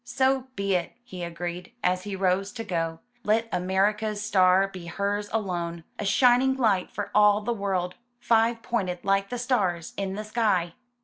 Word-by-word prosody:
''So 260 Hz, +1 st, +1 dB
be 200 Hz, 0 st, 0 dB
it!" 180 Hz, -2 st, -1 dB
he 185 Hz, -7 st, -8 dB
agreed, 175 Hz, +1 st, -5 dB
as 180 Hz, +1 st, +1 dB
he 205 Hz, -1 st, -4 dB
rose 190 Hz, +1 st, +1 dB
to 230 Hz, -, -5 dB
go. 165 Hz, -5 st, -2 dB, 0.2 s
''Let 225 Hz, +2 st, +2 dB
America's 205 Hz, +4 st, 0 dB
star 190 Hz, -2 st, +4 dB
be 185 Hz, -3 st, -9 dB
hers 200 Hz, +3 st, -2 dB
alone 175 Hz, -6 st, -2 dB
— -, -, -39 dB
a 210 Hz, -, -2 dB
shining 250 Hz, +5 st, +4 dB
light 215 Hz, -8 st, +1 dB
for 205 Hz, -, -5 dB
all 210 Hz, 0 st, +5 dB
the 235 Hz, +3 st, -1 dB
world, 190 Hz, -4 st, -1 dB, 0.3 s
five 230 Hz, 0 st, +2 dB
pointed 185 Hz, -7 st, -2 dB
like 195 Hz, 0 st, +2 dB
the 245 Hz, -, -3 dB
stars 200 Hz, -9 st, 0 dB
in 195 Hz, -1 st, -2 dB
the 210 Hz, -, -4 dB
sky." 210 Hz, -6 st, 0 dB
200 Hz, 175 wpm, -26 LUFS, 180-225 Hz, 0.3 s, all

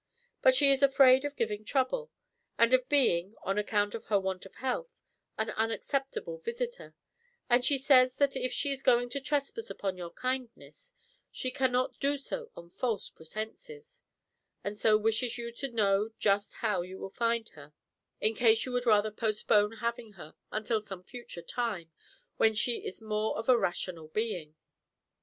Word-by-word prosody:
"But -, -, +6 dB
she 280 Hz, -, +6 dB
is 270 Hz, 0 st, +3 dB
afraid 270 Hz, -1 st, +6 dB
of 290 Hz, 0 st, -4 dB
giving 215 Hz, -4 st, -2 dB
trouble, 280 Hz, -, 0 dB, 0.5 s
and 235 Hz, +2 st, +4 dB
of 255 Hz, 0 st, +3 dB
being, 210 Hz, -9 st, +3 dB
on 195 Hz, +2 st, 0 dB
account 205 Hz, -1 st, 0 dB
of 230 Hz, -, -6 dB
her 205 Hz, -2 st, +2 dB
want 190 Hz, 0 st, -4 dB
of -, -, -22 dB
health, 470 Hz, -, -4 dB, 0.3 s
an 220 Hz, 0 st, -1 dB
unacceptable 275 Hz, -, -2 dB
visitor; 480 Hz, +1 st, -5 dB, 0.6 s
and 245 Hz, +1 st, +5 dB
she 275 Hz, +2 st, +3 dB
says 260 Hz, -2 st, +5 dB
that 280 Hz, -1 st, +2 dB
if 255 Hz, -1 st, -1 dB
she 280 Hz, +3 st, -1 dB
is 270 Hz, -1 st, -3 dB
going 245 Hz, -2 st, +3 dB
to 280 Hz, +3 st, -4 dB
trespass 290 Hz, -, -2 dB
upon 190 Hz, -2 st, -3 dB
your 175 Hz, -1 st, -6 dB
kindness, 255 Hz, -, -5 dB, 0.4 s
she 255 Hz, -, -3 dB
cannot 255 Hz, -1 st, 0 dB
do 285 Hz, +1 st, +1 dB
so 465 Hz, -, -6 dB
on 170 Hz, 0 st, -12 dB
false 230 Hz, -2 st, -2 dB
pretenses, 440 Hz, -, -8 dB, 0.6 s
and 200 Hz, +1 st, -3 dB
so 215 Hz, 0 st, +4 dB
wishes 225 Hz, +3 st, 0 dB
you 235 Hz, 0 st, -5 dB
to 275 Hz, +4 st, -5 dB
know 210 Hz, -2 st, +2 dB
just 200 Hz, 0 st, +1 dB
how 210 Hz, -5 st, +1 dB
you 185 Hz, +2 st, -8 dB
will 195 Hz, -, -7 dB
find 230 Hz, 0 st, 0 dB
her, 145 Hz, -1 st, -14 dB, 0.5 s
in 220 Hz, -, +2 dB
case 225 Hz, -1 st, +4 dB
you 255 Hz, -, -5 dB
would 245 Hz, 0 st, -1 dB
rather 215 Hz, -1 st, +4 dB
postpone 215 Hz, -1 st, +1 dB
having 230 Hz, -1 st, -4 dB
her 155 Hz, -5 st, -12 dB, 0.2 s
until 215 Hz, +1 st, -1 dB
some 195 Hz, -3 st, -9 dB
future 240 Hz, -5 st, -9 dB
time, 210 Hz, -10 st, -3 dB, 0.5 s
when 220 Hz, -1 st, +4 dB
she 235 Hz, +3 st, +1 dB
is 205 Hz, -, -8 dB
more 215 Hz, 0 st, -1 dB
of 225 Hz, -, -5 dB
a 255 Hz, -, +7 dB
rational 175 Hz, -6 st, -2 dB
being." 170 Hz, -4 st, -3 dB
230 Hz, 170 wpm, -30 LUFS, 210-265 Hz, 0.6 s, a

